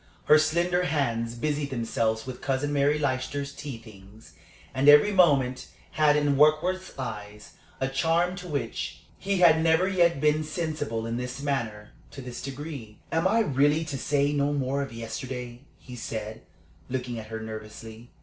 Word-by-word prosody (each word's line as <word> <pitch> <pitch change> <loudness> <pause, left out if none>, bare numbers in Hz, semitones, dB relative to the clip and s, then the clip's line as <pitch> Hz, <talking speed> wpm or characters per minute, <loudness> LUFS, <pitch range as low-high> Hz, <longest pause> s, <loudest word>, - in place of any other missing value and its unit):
Her 155 - +7
slender 175 +3 +1
hands 120 -7 -1
busied 145 +3 -2
themselves 115 -3 -1
with 130 -1 -7
Cousin 135 +2 -1
Mary 145 +1 +2
Leicester's 140 0 -2
tea 140 -5 -7
things; 105 -1 -16 0.4
and 135 +2 +4
every 150 +8 +7
movement 140 -9 +3 0.2
had 150 -1 +3
in 145 -2 +2
Warkworth's 155 +6 +2
eyes 105 -4 -7 0.3
a 130 - 0
charm 165 +6 +1
to 180 -1 -8
which 145 -4 -4 0.2
he 195 -1 -1
had 160 -2 +6
never 165 +3 +3
yet 170 -5 +2
been 150 +1 +2
sensible, 155 -8 -3
in 115 +1 -3
this 125 +2 -5
manner, 115 -7 -3 0.2
to - - -11
this 125 -1 -7
degree. 135 -5 -7
"Am 165 +3 +2
I 225 +4 +3
really 145 -2 +2
to 145 -3 -4
say 145 +1 +1
no 145 0 +1
more 140 0 -1
of 140 - -5
yesterday?" 120 +1 -6 0.2
he 125 - -11
said, 110 -2 -5 0.5
looking 125 -2 -3
at 110 - -9
her 110 0 -5
nervously. 110 +1 -9
140 Hz, 160 wpm, -27 LUFS, 115-155 Hz, 0.5 s, Her